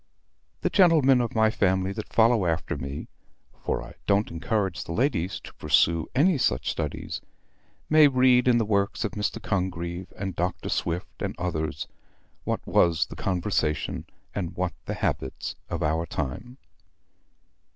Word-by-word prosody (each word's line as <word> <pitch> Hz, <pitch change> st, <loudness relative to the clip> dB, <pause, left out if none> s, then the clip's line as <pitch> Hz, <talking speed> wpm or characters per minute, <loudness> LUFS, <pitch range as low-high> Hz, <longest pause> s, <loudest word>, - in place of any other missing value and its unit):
The -, -, 0 dB
gentlemen 155 Hz, -9 st, +5 dB
of 120 Hz, -, -3 dB
my 110 Hz, 0 st, +4 dB
family 95 Hz, -2 st, +1 dB
that -, -, -6 dB
follow 115 Hz, -4 st, +4 dB
after 80 Hz, -1 st, -1 dB
me 70 Hz, 0 st, -6 dB, 0.6 s
(for -, -, -1 dB
I -, -, -11 dB
don't 100 Hz, +1 st, +2 dB
encourage 95 Hz, +1 st, -1 dB
the 85 Hz, -, -6 dB
ladies 100 Hz, -, 0 dB
to -, -, -11 dB
pursue 85 Hz, -1 st, +2 dB
any 155 Hz, +3 st, +4 dB
such 65 Hz, -, +1 dB
studies), -, -, -4 dB, 0.7 s
may 155 Hz, -1 st, +7 dB
read 130 Hz, -2 st, +4 dB
in 120 Hz, -1 st, +5 dB
the 115 Hz, -, +2 dB
works 100 Hz, +1 st, 0 dB
of 110 Hz, -, -1 dB
Mr. 105 Hz, +2 st, -2 dB
Congreve, 90 Hz, -4 st, -3 dB
and 95 Hz, -2 st, -4 dB
Dr. 90 Hz, +1 st, -2 dB
Swift 85 Hz, +1 st, -3 dB
and -, -, -2 dB
others, 80 Hz, -3 st, -3 dB, 0.6 s
what -, -, -2 dB
was 80 Hz, -2 st, +3 dB
the -, -, -10 dB
conversation 80 Hz, -3 st, -1 dB, 0.3 s
and 90 Hz, -3 st, -3 dB
what 90 Hz, 0 st, -1 dB
the -, -, -3 dB
habits 65 Hz, -, -2 dB, 0.2 s
of -, -, -2 dB
our 80 Hz, +2 st, 0 dB
time. 75 Hz, -, -4 dB
95 Hz, 150 wpm, -26 LUFS, 85-115 Hz, 0.7 s, may